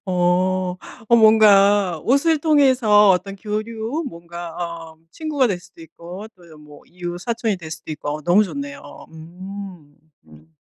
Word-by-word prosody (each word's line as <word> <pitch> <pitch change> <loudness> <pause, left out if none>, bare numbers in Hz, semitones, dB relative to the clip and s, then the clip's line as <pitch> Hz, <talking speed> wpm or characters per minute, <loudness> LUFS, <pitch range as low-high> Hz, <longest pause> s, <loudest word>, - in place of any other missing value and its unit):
어. 180 0 0 0.3
어 235 - +6
뭔가 205 -5 +5
옷을 290 +5 +2
통해서 260 -9 +4
어떤 195 +2 -1
교류 220 - -4
뭔가 170 -2 -9
어 165 -2 -7
친구가 300 -4 -1
될 195 -6 -2
수도 165 - -19
있고 170 +5 -10
또는 165 -4 -17
뭐 150 -1 -15
이웃사촌이 185 +5 -4
될 160 -3 -10
수도 155 0 -8
있고 150 0 -5
너무 175 +6 +4
좋네요. 280 - -8
음. 175 -1 -10 0.3
음. 80 +1 -20
185 Hz, 245 characters per minute, -20 LUFS, 170-220 Hz, 0.3 s, 어